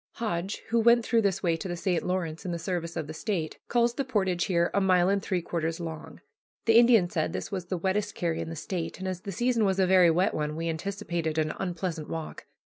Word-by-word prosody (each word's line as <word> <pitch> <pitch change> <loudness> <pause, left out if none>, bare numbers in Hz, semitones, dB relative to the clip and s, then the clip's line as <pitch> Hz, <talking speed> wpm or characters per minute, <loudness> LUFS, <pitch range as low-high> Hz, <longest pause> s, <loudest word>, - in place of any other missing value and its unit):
Hodge, 195 -3 -3
who 230 +1 +3
went 235 0 +5
through 230 -1 +3
this 195 -2 0
way 170 -2 +2
to 175 - -5
the 175 - -3
St. 175 -1 0
Lawrence 170 -3 -2
in 180 - -3
the 170 - -2
service 170 -1 -3
of 160 - -2
the 155 - -7
State, 165 -3 -3
calls 235 0 +2
the 275 - -1
portage 190 -9 0
here 170 -2 +1
a 200 - +2
mile 185 -1 +4
and 200 0 +2
three 185 -3 -1
quarters 165 0 -2
long. 165 -2 -7 0.4
The 225 0 +7
Indian 235 -6 +6
said 165 -1 -2
this - - -4
was 185 -3 -3
the 185 - -2
wettest 195 +4 -1
carry 170 -3 -1
in - - -5
the 165 - -5
State, 165 +1 -4
and 190 - -5
as 185 -1 -3
the 200 - -6
season 240 +3 +1
was 190 -2 +2
a 190 - +5
very 180 -2 +6
wet 185 +6 +2
one 150 0 -2
we 165 +1 -2
anticipated 170 -2 -3
an 155 -1 +1
unpleasant 175 -3 -3
walk. 160 -1 -6
180 Hz, 240 wpm, -28 LUFS, 165-200 Hz, 0.4 s, The